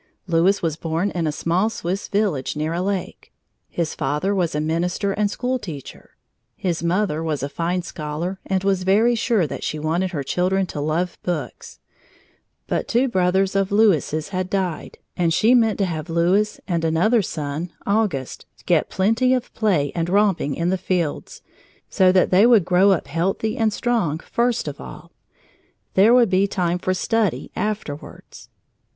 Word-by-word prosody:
Louis 180 +3 +2
was 160 -2 -1
born 165 +5 -1
in 170 -3 -1
a - - 0
small 175 +7 0
Swiss 190 -2 -4
village 195 -12 -1
near 155 +2 -2
a 175 - -1
lake. 195 -1 -4 0.4
His 170 -2 -2
father 150 +7 -1
was 175 -6 0
a - - 0
minister 175 +5 -1
and 205 +1 0
school 250 +4 -2
teacher. 155 - -10 0.4
His 175 -3 -2
mother 170 -1 0
was 155 -4 -2
a 140 - -2
fine 170 +4 -2
scholar 170 +3 -5
and 190 -1 -1
was 195 -1 +1
very 210 +6 +3
sure 225 -5 +1
that - - -6
she 155 - -2
wanted 165 +5 -1
her 150 -6 -4
children 185 +6 0
to 150 -4 -6
love 165 +4 -1
books, 175 -3 -5 0.9
but - - -2
two 250 +3 +2
brothers 190 -1 +1
of 195 0 +1
Louis's 185 -7 +2
had 185 -1 -3
died 185 -4 -3 0.2
and 170 -2 +1
she 230 +3 +4
meant 225 -4 +3
to 200 - +1
have 160 -2 -4
Louis 180 +6 +1
and 170 -3 -1
another 175 +9 +3
son, 155 0 -4
Auguste, 200 - -1 0.2
get - - +2
plenty 225 +7 +2
of 250 -1 -4
play 180 -11 +1
and 170 0 -2
romping 195 -7 +2
in 170 +1 -1
the 190 0 0
fields 175 -6 -3 0.5
so 185 -1 +4
that 185 -1 +3
they 195 +5 +6
would 225 -8 +5
grow 185 +2 +4
up 190 -4 +2
healthy 185 +9 -1
and 225 -1 +1
strong, 210 -10 0
first 235 +7 -1
of - - -6
all; - - -11 0.8
there 200 +4 +5
would 240 -5 +5
be 190 +2 +3
time 180 -3 -1
for 185 - -1
study 225 +2 -1
afterwards. 205 -9 -6
185 Hz, 170 wpm, -22 LUFS, 165-205 Hz, 0.9 s, they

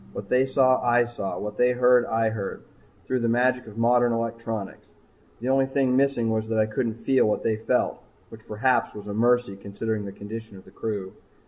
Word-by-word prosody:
What - - -7
they 130 +1 +3
saw 130 -1 +3
I 120 0 +3
saw, 120 -5 -5
what 105 0 -6
they 125 0 +3
heard 125 0 +4
I 115 0 +1
heard, 100 -3 -5 0.4
through 130 - -1
the 115 -1 0
magic 125 +1 +1
of 110 0 -11
modern 120 +1 +3
electronics. 115 -3 -4 0.5
The 125 +3 -3
only 135 0 +3
thing 135 -1 +1
missing 130 -4 +2
was 110 0 -1
that 110 - 0
I 110 - +4
couldn't 110 +1 -2
feel 130 +1 +2
what 105 - -1
they 110 -1 0
felt, 110 - 0 0.3
which 110 -1 -14
perhaps 125 +4 0
was 105 - -8
a 105 - -5
mercy 120 -1 +2
considering 105 +2 -4
the 100 - -6
condition 105 +1 -9
of 95 - -15
the - - -16
crew. 100 -3 -5
115 Hz, 205 wpm, -25 LUFS, 110-125 Hz, 0.5 s, heard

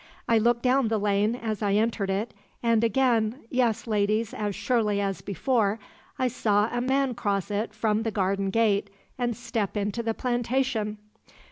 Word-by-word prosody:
I 230 -1 +4
looked 235 +1 +2
down 255 -1 +3
the 220 0 +1
lane 205 +2 +1
as 220 -4 -4
I 200 -2 +1
entered 215 -2 +1
it, 200 +4 -2 0.3
and 230 -1 +3
again 230 +1 +2
yes, 235 -3 +1
ladies, 215 0 0
as 205 -2 -3
surely 210 -1 +1
as 195 -1 -2
before 210 0 0 0.4
I 260 -2 +1
saw 215 -3 +1
a 240 - 0
man 265 +1 +1
cross 205 -4 -2
it 210 +2 -1
from 215 0 0
the 225 - -1
garden 195 -1 0
gate 205 -1 +2 0.3
and 240 -2 -1
step 225 -4 -2
into 205 +3 -1
the 225 -1 -2
plantation! 240 -3 -1
220 Hz, 165 wpm, -26 LUFS, 205-240 Hz, 0.4 s, I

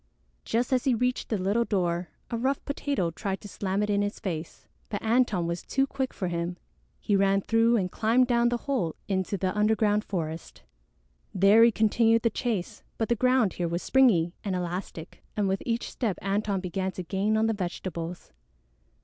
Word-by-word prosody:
Just 240 +3 0
as 255 - +1
he 260 -3 +3
reached 250 +2 -1
the 220 - 0
little 200 +5 +1
door, 175 -5 -1 0.2
a - - -1
rough 260 +4 -1
Potato 280 - -1
tried 195 +3 -3
to 205 - -9
slam 195 0 -2
it 210 - -2
in 200 0 +2
his 205 +1 -2
face. 165 -4 -5 0.2
But 205 - -4
Antone 220 -6 +2
was 170 +1 -3
too 270 0 0
quick 265 -1 -3
for 185 - -3
him. 170 +1 -3 0.4
He 205 - +1
ran 195 0 +3
through 230 +3 +3
and 185 -3 -1
climbed 235 +4 +3
down 240 -1 +3
the 240 - 0
hole 245 - -1
into 190 0 -1
the 185 +1 -1
underground 210 0 +2
forest. 165 -5 -5 0.7
There 200 +4 +6
he 235 - +6
continued 225 +1 +3
the 230 - +2
chase, 215 -6 -3 0.2
but 225 - -1
the 235 - +3
ground 250 -4 +2
here 175 - -2
was 170 +2 -3
springy 200 -11 +4
and 195 -3 -2
elastic, 175 -1 -5 0.2
and 205 -2 +2
with 190 0 0
each 235 0 -1
step 215 -7 -2
Antone 200 0 0
began 190 +1 -2
to 185 - -5
gain 195 +5 0
on 220 - +2
the 225 - +1
vegetables. 175 -3 -5
205 Hz, 190 wpm, -27 LUFS, 185-230 Hz, 0.7 s, There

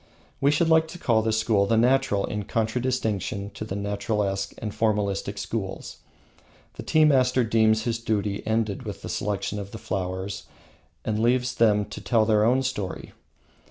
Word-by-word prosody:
We 140 - +3
should 155 +3 +2
like 160 0 +4
to 165 - -9
call 115 -9 +2
this 110 0 0
school 110 -3 +2
the 115 - +2
Natural 125 -4 +2
in 105 -1 -4
contradistinction 110 -3 -1
to - - -7
the 105 -3 -5
Naturalesque 100 -1 -2
and 105 - -4
Formalistic 105 -3 -1
schools. - - -5 0.8
The - - -8
tea 155 0 +3
master 130 -3 +3
deems 110 -1 +3
his 115 -1 -1
duty 105 -3 -1
ended 110 -2 0
with - - -7
the - - -6
selection 105 0 -2
of 100 -1 -6
the 110 - -8
flowers, 95 0 -4 0.6
and 110 0 -1
leaves 125 +2 +2
them 105 -3 +3
to - - -9
tell 115 -3 +2
their 105 -1 +3
own 125 +4 +3
story. 105 -8 -4
110 Hz, 165 wpm, -25 LUFS, 100-125 Hz, 0.8 s, like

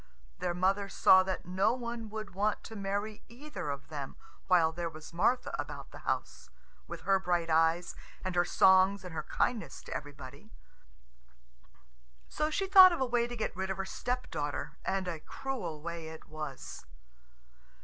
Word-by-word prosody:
Their 175 -1 -1
mother 195 +2 +1
saw 190 -1 +6
that 185 0 -3
no 185 +5 +2
one 235 -3 -5
would 215 -2 -6
want 205 +3 0
to 225 - -9
marry 205 +1 -3
either 255 - -6
of 140 -1 -5
them 145 -3 -6 0.3
while 170 -3 +5
there 170 +1 -3
was 155 0 -11
Martha 240 +9 +1
about - - -6
the - - -10
house, - - -3 0.4
with - - -7
her 195 -1 +3
bright 175 -3 0
eyes 165 +2 +2 0.3
and 185 - -1
her 175 0 +4
songs 190 +2 +5
and 180 - -7
her 155 - -2
kindness 225 +7 -2
to - - -7
everybody. 145 +5 -8 1.8
So 305 0 -1
she 390 +5 0
thought 375 -1 +10
of 345 - -2
a 265 - +2
way 240 -1 +1
to 240 - -6
get 220 - -3
rid 190 +1 -3
of 190 - -2
her 195 - -2
stepdaughter, 155 - -3
and 190 -1 -1
a 170 -3 -3
cruel 175 - -5
way 170 -1 -5
it 160 0 -10
was. 155 -3 -7
190 Hz, 170 wpm, -31 LUFS, 165-220 Hz, 1.8 s, thought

